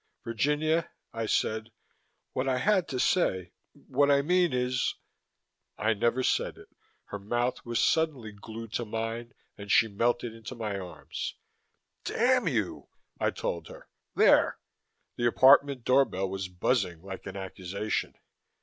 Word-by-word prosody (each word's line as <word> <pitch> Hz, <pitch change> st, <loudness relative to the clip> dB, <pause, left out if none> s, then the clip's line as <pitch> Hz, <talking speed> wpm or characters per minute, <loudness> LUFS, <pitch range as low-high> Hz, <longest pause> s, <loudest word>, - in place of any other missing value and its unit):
"Virginia," 150 Hz, +8 st, 0 dB, 0.2 s
I 115 Hz, -1 st, -3 dB
said, 110 Hz, +1 st, 0 dB, 0.6 s
"what 135 Hz, +1 st, -1 dB
I 130 Hz, -, +1 dB
had 190 Hz, +5 st, +2 dB
to 130 Hz, -, -3 dB
say 95 Hz, -, +1 dB, 0.2 s
what 140 Hz, +2 st, 0 dB
I 140 Hz, 0 st, +4 dB
mean 180 Hz, +1 st, +3 dB
is 125 Hz, 0 st, 0 dB, 0.4 s
" -, -, -55 dB
I 110 Hz, +3 st, +2 dB
never 120 Hz, +4 st, +1 dB
said -, -, 0 dB
it. -, -, -15 dB, 0.4 s
Her 100 Hz, -, -5 dB
mouth 120 Hz, +5 st, -1 dB
was 120 Hz, 0 st, 0 dB
suddenly 150 Hz, -9 st, +1 dB
glued 110 Hz, +2 st, -9 dB
to 120 Hz, -, -1 dB
mine 115 Hz, +3 st, -4 dB, 0.2 s
and 100 Hz, 0 st, -5 dB
she 115 Hz, -, +6 dB
melted 115 Hz, +2 st, 0 dB
into 115 Hz, +2 st, -9 dB
my 105 Hz, -4 st, -3 dB
arms. 90 Hz, -4 st, -6 dB, 0.7 s
"Damn -, -, +2 dB
you!" -, -, -2 dB, 0.3 s
I -, -, +2 dB
told 85 Hz, -2 st, -4 dB
her. -, -, -13 dB, 0.3 s
"There." -, -, +5 dB, 0.6 s
The 120 Hz, -, +2 dB
apartment 135 Hz, +1 st, +5 dB
door 135 Hz, +2 st, +5 dB
bell 95 Hz, -3 st, -3 dB
was 95 Hz, 0 st, -4 dB
buzzing 90 Hz, -2 st, -1 dB
like 95 Hz, -1 st, -8 dB
an 95 Hz, -, -6 dB
accusation. 95 Hz, +2 st, -3 dB
115 Hz, 145 wpm, -29 LUFS, 100-130 Hz, 0.7 s, she